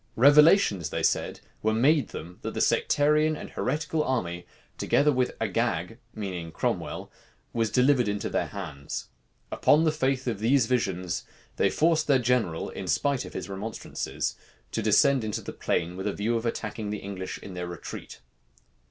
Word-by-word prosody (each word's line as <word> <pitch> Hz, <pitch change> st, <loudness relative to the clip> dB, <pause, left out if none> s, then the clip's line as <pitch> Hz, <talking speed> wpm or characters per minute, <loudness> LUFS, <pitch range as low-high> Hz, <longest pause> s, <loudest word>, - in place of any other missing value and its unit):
Revelations, 145 Hz, -, +6 dB
they -, -, -3 dB
said, -, -, 0 dB, 0.2 s
were 110 Hz, 0 st, +1 dB
made 140 Hz, +1 st, +3 dB
them, 85 Hz, +3 st, -9 dB
that -, -, -5 dB
the -, -, -1 dB
sectarian 150 Hz, +2 st, +3 dB
and -, -, -8 dB
heretical 155 Hz, +2 st, -1 dB
army, 90 Hz, -11 st, -2 dB, 0.3 s
together 150 Hz, +1 st, +3 dB
with 130 Hz, -2 st, 0 dB
Agag, -, -, -1 dB, 0.2 s
meaning 90 Hz, -6 st, -5 dB
Cromwell, -, -, -3 dB, 0.4 s
was 115 Hz, -2 st, +1 dB
delivered 125 Hz, 0 st, +3 dB
into 105 Hz, 0 st, -1 dB
their -, -, -1 dB
hands. 80 Hz, -8 st, -6 dB, 0.4 s
Upon 150 Hz, +2 st, +4 dB
the 160 Hz, -, +3 dB
faith 135 Hz, -3 st, 0 dB
of 115 Hz, -5 st, -2 dB
these 120 Hz, +3 st, +3 dB
visions, 95 Hz, -8 st, -1 dB, 0.3 s
they -, -, +3 dB
forced 160 Hz, 0 st, +2 dB
their 140 Hz, -2 st, +5 dB
general, 120 Hz, -9 st, 0 dB
in -, -, -6 dB
spite 140 Hz, -3 st, +1 dB
of -, -, -10 dB
his -, -, -5 dB
remonstrances, 100 Hz, +3 st, -4 dB, 0.4 s
to 115 Hz, -, -1 dB
descend 130 Hz, +5 st, +4 dB
into 105 Hz, -1 st, -3 dB
the -, -, -7 dB
plain 85 Hz, +1 st, -1 dB
with 95 Hz, +2 st, -4 dB
a 100 Hz, -, 0 dB
view 115 Hz, +3 st, -1 dB
of 115 Hz, +1 st, -1 dB
attacking 110 Hz, -2 st, -3 dB
the 105 Hz, -, -2 dB
English 95 Hz, -2 st, -6 dB
in 95 Hz, -, -10 dB
their 90 Hz, -1 st, -4 dB
retreat. 85 Hz, -6 st, -8 dB
115 Hz, 165 wpm, -27 LUFS, 95-140 Hz, 0.4 s, Revelations